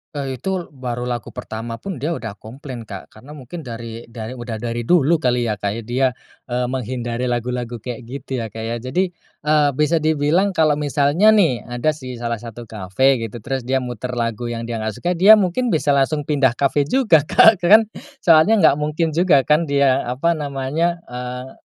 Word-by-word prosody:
Eee, 135 -3 -4
itu 190 -4 -3
baru 125 -3 -5
lagu 120 -2 -5
pertama 115 +1 -6
pun 185 +2 -7
dia 160 +4 -2
udah 110 -3 -6
komplain, 120 -1 -9
Kak, 100 -1 -9
karena 135 +8 -13
mungkin 145 +5 -9
dari 115 -3 -8
dari 115 0 -7
udah 120 -2 -6
dari 115 +1 -4
dulu 170 -1 +4
kali 125 -4 +1
ya, 105 - -4
Kak, 105 +3 -3
dia, 125 +2 0 0.3
eee, 125 0 -1
menghindari 125 -1 -3
lagu-lagu 120 0 -2
kayak 115 0 -7
gitu 130 -1 -5
ya, 115 - -3
Kak, 110 +1 -8
ya. 115 +1 -2
Jadi, 175 +10 -1 0.3
eee, 150 -1 +3
bisa 150 +3 +2
dibilang 160 +5 +1
kalau 155 -2 +3
misalnya 145 +7 +2
nih 165 - +3
ada 120 +5 0
sih 130 -5 -8
salah 115 -1 -3
satu 120 0 -9
kafe 110 +5 +1
gitu 115 0 -6
terus 130 -2 -4
dia 130 -1 +1
muter 125 +1 -5
lagu 115 0 -2
yang 115 -1 -4
dia 115 -1 -4
nggak 110 -1 -3
suka, 175 - -2
dia 190 +5 +7
mungkin 210 +5 0
bisa 155 -7 +1
langsung 140 +2 +1
pindah 140 -5 +1
kafe 140 +1 +1
juga, 230 - +4
Kak, 220 -4 +6
kan 205 +6 +7 0.4
soalnya 165 +6 +6
nggak 140 - +6
mungkin 155 +2 -1
juga 160 -4 +3
kan 155 +2 +2
dia 140 -2 +2
apa 135 +8 0
namanya, 150 +5 -2
eee, 125 +1 -7
130 Hz, 190 wpm, -20 LUFS, 120-155 Hz, 0.4 s, dia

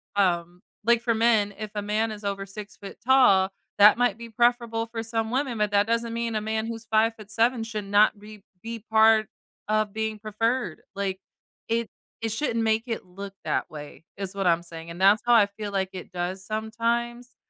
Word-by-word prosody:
um, 175 -2 0 0.2
like, 235 0 +4
for 235 - +2
men, 220 -3 +3
if 215 - -4
a 205 - -1
man 215 +2 0
is 210 0 -8
over 195 0 -2
6' 205 0 -9
tall, 225 -8 +5 0.3
that 210 +2 +8
might 240 -4 +2
be 235 0 -9
preferable 235 0 +1
for 225 0 -5
some 225 0 -2
women, 260 -2 -1
but 210 - +2
that 205 0 +3
doesn't 230 0 0
mean 230 -1 -2
a 215 - 0
man 220 +1 -2
who's 230 0 -6
5'7" 225 +2 +1
should 215 -2 -5
not 205 +1 +4
be 210 -1 -13 0.2
be 230 0 -5
part 220 0 +4 0.4
of 215 -1 +1
being 220 0 -2
preferred. 215 -2 -1
Like, 195 -1 -2 0.5
it 230 0 0 0.3
it 225 - -1
shouldn't 230 -1 -1
make 220 0 +2
it 225 -5 -4
look 195 +2 -9
that - - -1
way 150 -1 -10
is 195 -1 -5
what 195 -2 0
I'm 170 0 +3
saying, 165 -1 -9
and 170 - -9
that's 200 +3 +6
how 240 - +4
I 215 -3 +7
feel 205 0 -7
like 190 -1 -1
it 185 +1 -8
does 180 +2 -4
sometimes, 235 +3 -2
215 Hz, 190 wpm, -26 LUFS, 200-230 Hz, 0.5 s, that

